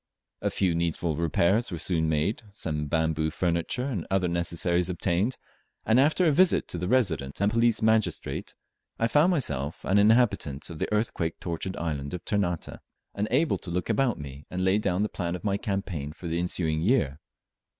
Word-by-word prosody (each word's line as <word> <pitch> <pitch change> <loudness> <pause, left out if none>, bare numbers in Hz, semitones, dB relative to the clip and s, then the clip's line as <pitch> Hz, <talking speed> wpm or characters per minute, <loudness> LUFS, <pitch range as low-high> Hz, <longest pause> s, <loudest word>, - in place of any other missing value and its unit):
A - - +1
few 95 -3 +1
needful 85 -1 -1
repairs 85 +8 +2
were 85 - -4
soon 80 -1 0
made, 80 +10 0
some 75 -6 -3
bamboo 80 0 +1
furniture 85 +9 -1
and 115 -12 -3
other 95 -1 +1
necessaries 85 +1 0
obtained, 90 +6 0 0.5
and 110 +3 +4
after 155 +6 +3
a 160 - +5
visit 180 +5 +3
to 85 - -3
the 90 - -2
Resident 85 - 0
and 100 +1 +2
Police 115 -1 +2
Magistrate 110 -1 0 0.4
I 115 - +2
found 150 +9 +4
myself 75 - -2
an 100 +2 +3
inhabitant 105 - +2
of 80 - -8
the - - -2
earthquake 105 -6 -1
tortured 85 +2 -4
island 75 -2 -3
of 90 - -8
Ternate, 90 -5 -1 0.3
and 105 +1 -1
able 145 +6 +2
to - - -7
look 90 +1 -1
about 135 -5 +1
me 70 -1 -9
and 90 +1 -2
lay 95 +2 +3
down 95 -1 0
the - - +1
plan 85 -4 -3
of 90 - -8
my 100 -2 +1
campaign 95 - -3
for 85 - -8
the 85 +1 -1
ensuing 80 -3 0
year. 85 - +1
90 Hz, 180 wpm, -27 LUFS, 80-110 Hz, 0.5 s, a